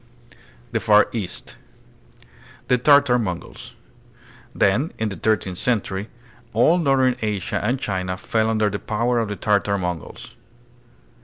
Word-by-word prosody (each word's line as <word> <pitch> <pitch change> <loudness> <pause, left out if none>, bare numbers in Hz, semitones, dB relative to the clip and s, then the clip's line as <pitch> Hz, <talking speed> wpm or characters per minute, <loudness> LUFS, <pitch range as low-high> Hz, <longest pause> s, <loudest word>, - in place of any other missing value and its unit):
The 115 - 0
Far 105 +1 +4
East. 100 -6 -6 1.1
The 125 - +3
Tartar 140 -2 +5
Mongols. 90 -6 -6 0.8
Then 120 - +2
in 110 -1 -1
the 100 - -6
thirteenth 95 -2 -1
century 105 -4 -1 0.4
all 155 +10 +4
northern 135 -5 +2
Asia 105 -4 -2
and 125 +5 0
China 95 -5 -3
fell 110 +4 0
under 110 -2 +1
the 100 - -3
power 120 +3 0
of 115 - -1
the 105 - -3
Tartar 100 -1 +1
Mongols. 90 -4 -6
110 Hz, 130 wpm, -22 LUFS, 100-125 Hz, 1.1 s, Tartar